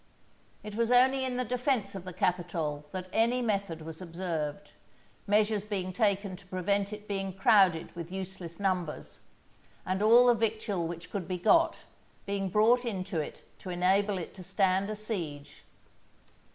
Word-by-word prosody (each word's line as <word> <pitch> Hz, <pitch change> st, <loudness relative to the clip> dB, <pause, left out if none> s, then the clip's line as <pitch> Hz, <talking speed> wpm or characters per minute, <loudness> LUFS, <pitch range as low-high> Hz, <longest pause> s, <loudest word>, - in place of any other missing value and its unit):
It 210 Hz, 0 st, -7 dB
was 230 Hz, +2 st, 0 dB
only 260 Hz, +2 st, +5 dB
in 250 Hz, -1 st, -2 dB
the 250 Hz, -, 0 dB
defence 250 Hz, -3 st, 0 dB
of 190 Hz, -2 st, -7 dB
the 185 Hz, -, -6 dB
Capitol 170 Hz, -5 st, -1 dB
that 185 Hz, -1 st, -5 dB
any 235 Hz, +3 st, +3 dB
method 200 Hz, -8 st, -1 dB
was 160 Hz, +2 st, -8 dB
observed, 170 Hz, -1 st, -4 dB, 0.6 s
measures 210 Hz, 0 st, +2 dB
being 190 Hz, -3 st, -3 dB
taken 200 Hz, -1 st, +1 dB
to 190 Hz, -, -18 dB
prevent 195 Hz, +2 st, 0 dB
it 210 Hz, 0 st, -8 dB
being 195 Hz, -1 st, -3 dB
crowded 190 Hz, -5 st, +4 dB
with 170 Hz, 0 st, -7 dB
useless 185 Hz, -2 st, -6 dB
numbers, 185 Hz, -5 st, -2 dB, 0.7 s
and 185 Hz, +2 st, -1 dB
all 235 Hz, +3 st, +7 dB
the 245 Hz, -, +6 dB
victual 215 Hz, -6 st, -1 dB
which 170 Hz, +1 st, -8 dB
could 190 Hz, -5 st, -4 dB
be 185 Hz, -, -2 dB
got, 335 Hz, -, +4 dB, 0.5 s
being 200 Hz, -1 st, -2 dB
brought 225 Hz, +6 st, +4 dB
into 190 Hz, -6 st, -3 dB
it 150 Hz, -, -6 dB
to 185 Hz, -, -8 dB
enable 190 Hz, +3 st, +2 dB
it 175 Hz, -, -6 dB
to 185 Hz, -, -10 dB
stand 190 Hz, +1 st, +1 dB
a 215 Hz, -, -3 dB
siege. 170 Hz, -10 st, -6 dB
195 Hz, 160 wpm, -30 LUFS, 180-215 Hz, 0.7 s, all